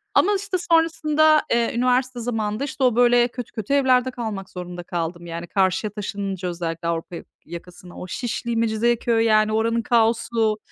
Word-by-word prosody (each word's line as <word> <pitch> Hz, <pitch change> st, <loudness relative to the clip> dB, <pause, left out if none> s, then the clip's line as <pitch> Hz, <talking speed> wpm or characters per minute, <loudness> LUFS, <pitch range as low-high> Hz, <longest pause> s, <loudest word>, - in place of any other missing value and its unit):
Ama, 410 Hz, -, +4 dB
işte, 390 Hz, -2 st, -2 dB
sonrasında, 310 Hz, -1 st, +4 dB
eee, 235 Hz, 0 st, +1 dB
üniversite 250 Hz, 0 st, +1 dB
zamanında, 225 Hz, 0 st, -2 dB
işte, 275 Hz, -1 st, -3 dB
o, 245 Hz, -3 st, +3 dB
böyle, 245 Hz, 0 st, +4 dB
kötü 245 Hz, -1 st, -8 dB
kötü 220 Hz, +5 st, -3 dB
evlerde 260 Hz, -2 st, +3 dB
kalmak 215 Hz, -6 st, -5 dB
zorunda 180 Hz, -1 st, -7 dB
kaldım. 170 Hz, 0 st, -4 dB
Yani, 170 Hz, +1 st, -6 dB
karşıya 195 Hz, +2 st, 0 dB
taşınınca 195 Hz, -3 st, -4 dB
özellikle 170 Hz, -1 st, -4 dB
Avrupa 170 Hz, +1 st, -3 dB
ya -, -, -8 dB, 0.2 s
yakasına, 175 Hz, +1 st, -11 dB
o 180 Hz, -, -7 dB
Şişli, 235 Hz, +3 st, -3 dB
Mecidiyeköy, 230 Hz, +1 st, +1 dB
yani, 215 Hz, -1 st, +3 dB
oranın 230 Hz, +1 st, +1 dB
kaosu, 225 Hz, -1 st, +1 dB
225 Hz, 155 wpm, -22 LUFS, 185-245 Hz, 0.2 s, Ama